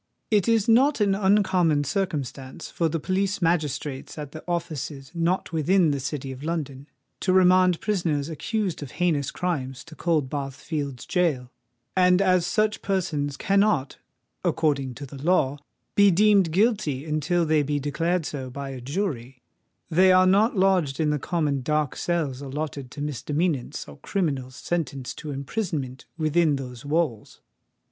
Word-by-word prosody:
It 205 Hz, -4 st, +3 dB
is 225 Hz, -3 st, +3 dB
not 260 Hz, +5 st, +4 dB
an 200 Hz, -2 st, +3 dB
uncommon 190 Hz, -6 st, +3 dB
circumstance 140 Hz, -6 st, -3 dB
for 165 Hz, -2 st, 0 dB
the 165 Hz, +1 st, -2 dB
police 195 Hz, +4 st, -1 dB
magistrates 155 Hz, -6 st, -1 dB
at 145 Hz, -2 st, -6 dB
the 155 Hz, -, -9 dB
offices 150 Hz, -5 st, -4 dB
not 170 Hz, +1 st, -1 dB
within 165 Hz, +1 st, +3 dB
the 140 Hz, -, -1 dB
City 135 Hz, 0 st, -4 dB
of 130 Hz, 0 st, -9 dB
London 145 Hz, -4 st, -4 dB, 0.3 s
to 185 Hz, -, 0 dB
remand 185 Hz, -1 st, +5 dB
prisoners 165 Hz, -9 st, 0 dB
accused 185 Hz, +3 st, -2 dB
of 145 Hz, -, -8 dB
heinous 160 Hz, -6 st, +1 dB
crimes 135 Hz, -8 st, -3 dB
to 165 Hz, -1 st, -13 dB
Coldbath 145 Hz, -5 st, -1 dB
Fields' 140 Hz, -5 st, -5 dB
gaol; 150 Hz, -9 st, 0 dB, 0.4 s
and 180 Hz, -1 st, +5 dB
as 185 Hz, -3 st, +3 dB
such 215 Hz, +1 st, +1 dB
persons 150 Hz, -8 st, -1 dB
cannot, 195 Hz, -8 st, +1 dB, 0.4 s
according 140 Hz, -5 st, 0 dB
to 140 Hz, -, -7 dB
the 135 Hz, 0 st, -10 dB
law, 145 Hz, -4 st, +2 dB, 0.3 s
be 205 Hz, 0 st, +6 dB
deemed 200 Hz, -1 st, +4 dB
guilty 185 Hz, -, +1 dB
until 155 Hz, +3 st, 0 dB
they 155 Hz, -1 st, +3 dB
be 145 Hz, 0 st, -1 dB
declared 165 Hz, +4 st, -1 dB
so 135 Hz, -4 st, -5 dB
by 140 Hz, +1 st, -6 dB
a 130 Hz, -2 st, -7 dB
jury, 135 Hz, -, -4 dB, 0.5 s
they 185 Hz, +3 st, +5 dB
are 185 Hz, 0 st, +6 dB
not 205 Hz, +4 st, +3 dB
lodged 185 Hz, -7 st, +2 dB
in 155 Hz, -2 st, +2 dB
the 150 Hz, -, 0 dB
common 150 Hz, -4 st, -1 dB
dark 150 Hz, +1 st, 0 dB
cells 155 Hz, -7 st, -1 dB
allotted 140 Hz, -1 st, -5 dB
to 145 Hz, -, -8 dB
misdemeanants 150 Hz, 0 st, -2 dB
or 70 Hz, -, -11 dB
criminals 140 Hz, -9 st, -2 dB
sentenced 140 Hz, -7 st, -3 dB
to 155 Hz, -, -7 dB
imprisonment 140 Hz, -, -4 dB
within 155 Hz, -1 st, +2 dB
those 125 Hz, -2 st, -7 dB
walls. 145 Hz, -7 st, -1 dB
155 Hz, 150 wpm, -25 LUFS, 140-185 Hz, 0.5 s, be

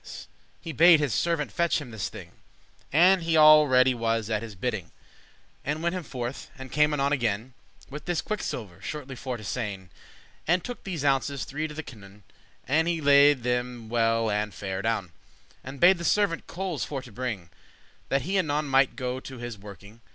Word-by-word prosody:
* -, -, -36 dB
*certainly -, -, -11 dB, 0.3 s
He 165 Hz, -, -6 dB
bade 165 Hz, +3 st, +7 dB
his 145 Hz, -6 st, 0 dB
servant 165 Hz, -4 st, 0 dB
fetche 170 Hz, -1 st, +1 dB
him 135 Hz, -5 st, -9 dB
this 110 Hz, -4 st, -4 dB
thing, -, -, -11 dB, 0.6 s
And 180 Hz, +5 st, +5 dB
he 165 Hz, -1 st, +1 dB
all 155 Hz, -1 st, +8 dB
ready 130 Hz, 0 st, +4 dB
was 115 Hz, -2 st, -1 dB
at 110 Hz, -1 st, 0 dB
his 110 Hz, -3 st, -8 dB
bidding, 100 Hz, -4 st, -3 dB, 0.7 s
And 150 Hz, +3 st, -3 dB
went 170 Hz, +1 st, 0 dB
him 185 Hz, -, -3 dB
forth, 125 Hz, -4 st, -6 dB
and 130 Hz, -1 st, -9 dB
came 150 Hz, 0 st, +3 dB
anon 140 Hz, -1 st, +1 dB
again 120 Hz, -2 st, -1 dB, 0.3 s
With 145 Hz, +1 st, -9 dB
this 175 Hz, -2 st, -1 dB
quicksilver, 110 Hz, -, -5 dB
shortly 140 Hz, -3 st, -6 dB
for 130 Hz, -1 st, -5 dB
to 110 Hz, -, -11 dB
sayn; 100 Hz, -4 st, -4 dB, 0.6 s
And 175 Hz, +2 st, +2 dB
took 245 Hz, -, -7 dB
these 170 Hz, -7 st, -4 dB
ounces 135 Hz, 0 st, 0 dB
three 155 Hz, +3 st, -3 dB
to 150 Hz, -, -10 dB
the 160 Hz, -, -5 dB
canoun; 105 Hz, -5 st, -14 dB, 0.4 s
And 160 Hz, +5 st, +2 dB
he 170 Hz, -1 st, 0 dB
them 145 Hz, -2 st, +5 dB
laide 125 Hz, -2 st, -2 dB
well 115 Hz, -1 st, +2 dB
and 105 Hz, +1 st, -1 dB
fair 95 Hz, -2 st, -4 dB
adown, 110 Hz, -5 st, -1 dB, 0.5 s
And 135 Hz, +1 st, -9 dB
bade 180 Hz, +1 st, +6 dB
the -, -, -5 dB
servant 200 Hz, -2 st, +1 dB
coales 180 Hz, -4 st, -3 dB
for 135 Hz, -3 st, -5 dB
to 125 Hz, -, -13 dB
bring, 105 Hz, -7 st, -5 dB, 0.6 s
That 135 Hz, -1 st, +1 dB
he 190 Hz, +5 st, 0 dB
anon 150 Hz, -3 st, 0 dB
might 135 Hz, -1 st, +3 dB
go 125 Hz, -1 st, -3 dB
to 130 Hz, 0 st, -10 dB
his 120 Hz, -1 st, -6 dB
working. 100 Hz, +2 st, -13 dB
135 Hz, 195 wpm, -26 LUFS, 115-155 Hz, 0.7 s, all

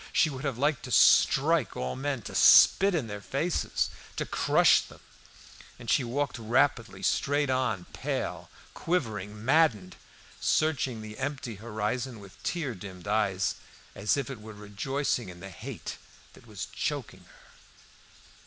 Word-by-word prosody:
She 155 Hz, -, +3 dB
would 135 Hz, 0 st, -7 dB
have 135 Hz, -4 st, -2 dB
liked 145 Hz, +1 st, +1 dB
to -, -, -8 dB
strike 150 Hz, -3 st, +4 dB
all 65 Hz, 0 st, -3 dB
men, 135 Hz, -4 st, -3 dB
to -, -, -8 dB
spit 195 Hz, -1 st, +7 dB
in 150 Hz, -7 st, 0 dB
their 105 Hz, -2 st, -7 dB
faces, 150 Hz, -, -1 dB, 0.2 s
to -, -, -2 dB
crush -, -, +4 dB
them, -, -, -14 dB, 0.8 s
and 120 Hz, -2 st, -4 dB
she 135 Hz, -, +3 dB
walked 130 Hz, +2 st, -2 dB
rapidly 120 Hz, +1 st, +1 dB
straight 145 Hz, 0 st, +1 dB
on, 125 Hz, -8 st, 0 dB
pale, -, -, -4 dB, 0.2 s
quivering, 110 Hz, -, -3 dB
maddened, 125 Hz, -, +2 dB, 0.4 s
searching 135 Hz, -7 st, 0 dB
the 110 Hz, 0 st, -9 dB
empty 135 Hz, -4 st, -3 dB
horizon 115 Hz, +3 st, -3 dB
with 100 Hz, +1 st, -15 dB
tear 155 Hz, -4 st, -2 dB
dimmed 95 Hz, -2 st, -10 dB
eyes, 100 Hz, -2 st, +1 dB, 0.4 s
and -, -, -10 dB
as 105 Hz, -, +3 dB
it 135 Hz, -4 st, -4 dB
were 110 Hz, 0 st, -10 dB
rejoicing 110 Hz, +4 st, -2 dB
in 90 Hz, -1 st, -11 dB
the 95 Hz, +2 st, -9 dB
hate 85 Hz, -, -7 dB, 0.4 s
that -, -, -18 dB
was -, -, -6 dB
choking -, -, -4 dB
her. -, -, -21 dB
120 Hz, 145 wpm, -28 LUFS, 105-140 Hz, 0.8 s, spit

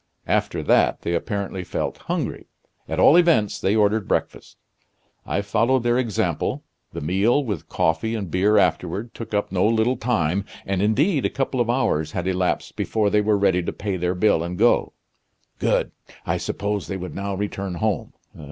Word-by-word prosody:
After -, -, 0 dB
that -, -, +2 dB
they 85 Hz, -, -1 dB
apparently 95 Hz, +1 st, -3 dB
felt -, -, -3 dB
hungry. -, -, -3 dB, 0.4 s
At -, -, -2 dB
all 150 Hz, -, +7 dB
events 125 Hz, -, +3 dB
they 100 Hz, +3 st, +2 dB
ordered 105 Hz, -1 st, +2 dB
breakfast. -, -, -3 dB, 0.7 s
I 100 Hz, -, -1 dB
followed 120 Hz, +5 st, +1 dB
their 120 Hz, +1 st, +2 dB
example. 115 Hz, -6 st, -1 dB, 0.3 s
The -, -, -6 dB
meal, 100 Hz, -, +2 dB
with 105 Hz, -, -5 dB
coffee 80 Hz, +8 st, 0 dB
and 100 Hz, -6 st, -4 dB
beer 100 Hz, +5 st, +3 dB
afterward, 100 Hz, +3 st, 0 dB
took 110 Hz, -2 st, -6 dB
up 105 Hz, -, -1 dB
no 95 Hz, -1 st, +1 dB
little 115 Hz, +3 st, +2 dB
time, 100 Hz, -6 st, 0 dB, 0.2 s
and 95 Hz, -1 st, -1 dB
indeed 135 Hz, -, +2 dB
a -, -, +1 dB
couple 130 Hz, -2 st, -1 dB
of 120 Hz, -, 0 dB
hours 80 Hz, -, 0 dB
had 90 Hz, 0 st, -2 dB
elapsed 90 Hz, -1 st, -1 dB
before 105 Hz, -2 st, 0 dB
they 105 Hz, -, +3 dB
were 105 Hz, 0 st, +2 dB
ready 100 Hz, -2 st, +2 dB
to 85 Hz, -, -3 dB
pay 100 Hz, -2 st, -3 dB
their 90 Hz, 0 st, -1 dB
bill 95 Hz, -3 st, +3 dB
and 85 Hz, +1 st, -4 dB
go. 120 Hz, +4 st, +3 dB, 0.7 s
Good! -, -, +1 dB, 0.3 s
I -, -, 0 dB
supposed 100 Hz, 0 st, -3 dB
they 95 Hz, -, -2 dB
would 90 Hz, 0 st, -6 dB
now 100 Hz, 0 st, -3 dB
return 100 Hz, -2 st, -4 dB
home. 110 Hz, +4 st, -2 dB
100 Hz, 175 wpm, -23 LUFS, 95-115 Hz, 0.7 s, all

